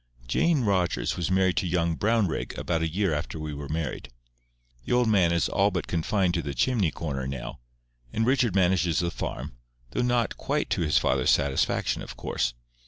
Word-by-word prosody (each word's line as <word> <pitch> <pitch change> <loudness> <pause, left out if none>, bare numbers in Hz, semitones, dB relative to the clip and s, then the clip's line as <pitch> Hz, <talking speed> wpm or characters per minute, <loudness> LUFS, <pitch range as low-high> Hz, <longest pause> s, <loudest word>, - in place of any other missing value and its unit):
Jane 150 - +2
Rogers 95 -5 +1
was 85 -1 -2
married 95 -1 +2
to 95 - +1
young 85 -1 +1
Brownrigg 110 -3 0
about 85 -2 -1
a 80 - +1
year 95 0 0
after 80 +2 -3
we 75 -1 -4
were 70 -1 -7
married. 75 -5 -3 0.7
The - - -2
old 125 -1 +3
man 95 -6 +4
is 85 0 +2
all 100 +1 +2
but 90 -4 -3
confined 90 +2 0
to 85 - 0
the 70 -3 -5
chimney 100 - +2
corner 70 -5 -4
now, 70 -3 -6 0.5
and 110 - 0
Richard 125 -5 +2
manages 90 -3 +2
the 85 -1 0
farm, - - -5 0.3
though - - -1
not 120 -2 +1
quite - - -2
to - - +1
his 75 -2 +2
father's - - +2
satisfaction, 70 -1 +1
of - - -9
course. 60 -1 -2
90 Hz, 185 wpm, -27 LUFS, 75-100 Hz, 0.7 s, man